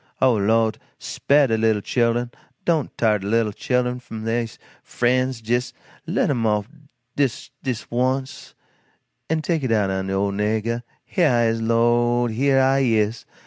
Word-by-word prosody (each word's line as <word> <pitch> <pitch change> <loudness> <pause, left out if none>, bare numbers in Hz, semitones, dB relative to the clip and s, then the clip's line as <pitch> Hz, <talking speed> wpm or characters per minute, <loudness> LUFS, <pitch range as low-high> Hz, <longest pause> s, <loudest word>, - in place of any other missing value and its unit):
Oh, 130 -2 +4
Lord, 110 +1 +1 0.2
spah 145 0 +2
de 110 -2 0
little 110 -2 +2
chil'en, 120 0 0 0.3
don't 160 -5 0
tar 110 -2 +2
de 95 - -6
little 115 0 +1
chil'en 125 +3 0
away 125 0 -2
f'm 110 -3 -8
dey 115 +1 0 0.4
frens, 125 -1 0
jes' 120 +2 0 0.3
let - - +1
'em 120 -4 -1
off 105 -1 0 0.5
jes' 140 -4 -1
dis 125 -5 -4
once, 130 +2 -2 0.7
and 160 0 0
take 165 0 0
it 130 -3 -1
out'n 95 -3 0
de 95 - -2
ole 100 +1 0
niggah. 110 +3 -1 0.2
HEAH 155 -10 +2
I 120 - +3
IS, 115 0 -1
LORD, 120 +1 +2
HEAH 135 +4 +2
I 135 +1 +3
IS! 110 -3 +1
120 Hz, 160 wpm, -22 LUFS, 110-130 Hz, 0.7 s, Oh